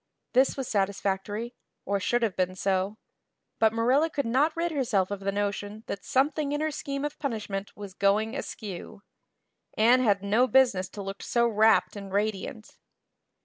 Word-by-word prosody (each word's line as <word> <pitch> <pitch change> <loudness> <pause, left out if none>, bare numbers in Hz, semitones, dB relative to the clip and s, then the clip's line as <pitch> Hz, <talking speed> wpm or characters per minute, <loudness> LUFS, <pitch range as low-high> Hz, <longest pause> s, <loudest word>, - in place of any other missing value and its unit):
This 260 +2 +3
was 265 -3 -3
satisfactory 200 +3 -1 0.3
or 200 +1 0
should 240 +5 +1
have 215 -5 0
been 185 0 0
so. 195 +2 0 0.6
But 220 -1 +5
Marilla 255 +8 +2
could 285 -3 -2
not 280 +8 +2
rid 340 0 0
herself 220 -10 0
of 200 - -3
the 195 0 -1
notion 205 +1 -3
that 200 - -5
something 285 +2 +1
in 295 - -1
her 310 0 0
scheme 280 -1 -4
of 295 - -5
punishment 210 -7 -4
was 200 -2 -8
going 210 +5 +1
askew. 205 -4 -7 0.7
Anne 240 +4 +5
had 200 -5 +2
no 220 +6 +3
business 240 -9 +3
to 200 - -7
look 195 0 -6
so 235 0 +2
rapt 220 -1 +3
and 200 -1 -8
radiant. 210 +2 -3
215 Hz, 165 wpm, -27 LUFS, 200-255 Hz, 0.7 s, But